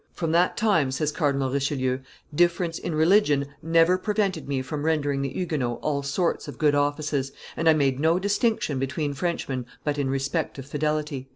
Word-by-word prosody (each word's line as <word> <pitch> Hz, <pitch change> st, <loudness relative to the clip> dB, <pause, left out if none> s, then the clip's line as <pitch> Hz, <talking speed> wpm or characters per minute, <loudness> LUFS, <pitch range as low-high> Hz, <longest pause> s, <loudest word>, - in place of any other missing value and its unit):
"From 165 Hz, -2 st, -2 dB
that 175 Hz, +2 st, +2 dB
time," 195 Hz, -11 st, +2 dB
says 145 Hz, +3 st, -1 dB
Cardinal 140 Hz, -3 st, 0 dB
Richelieu, 135 Hz, -2 st, 0 dB, 0.3 s
"difference 175 Hz, +1 st, +1 dB
in 165 Hz, -, -3 dB
religion 160 Hz, -3 st, +4 dB, 0.2 s
never 165 Hz, +3 st, +3 dB
prevented 200 Hz, -6 st, -1 dB
me 135 Hz, -2 st, -1 dB
from 150 Hz, +2 st, -4 dB
rendering 145 Hz, -3 st, 0 dB
the 135 Hz, -, -1 dB
Huguenots 145 Hz, -9 st, -2 dB
all 145 Hz, -2 st, 0 dB
sorts 155 Hz, +5 st, -1 dB
of -, -, -8 dB
good 150 Hz, -2 st, +3 dB
offices, 145 Hz, -1 st, 0 dB, 0.2 s
and 165 Hz, 0 st, +2 dB
I -, -, +7 dB
made 135 Hz, -3 st, +1 dB
no 160 Hz, +3 st, +3 dB
distinction 200 Hz, -, 0 dB
between 140 Hz, +2 st, -2 dB
Frenchmen 135 Hz, -5 st, -3 dB, 0.2 s
but 145 Hz, -1 st, -1 dB
in 135 Hz, -2 st, 0 dB
respect 135 Hz, +5 st, -2 dB
of 135 Hz, -, -7 dB
fidelity." 150 Hz, -2 st, -2 dB
150 Hz, 175 wpm, -25 LUFS, 140-165 Hz, 0.3 s, I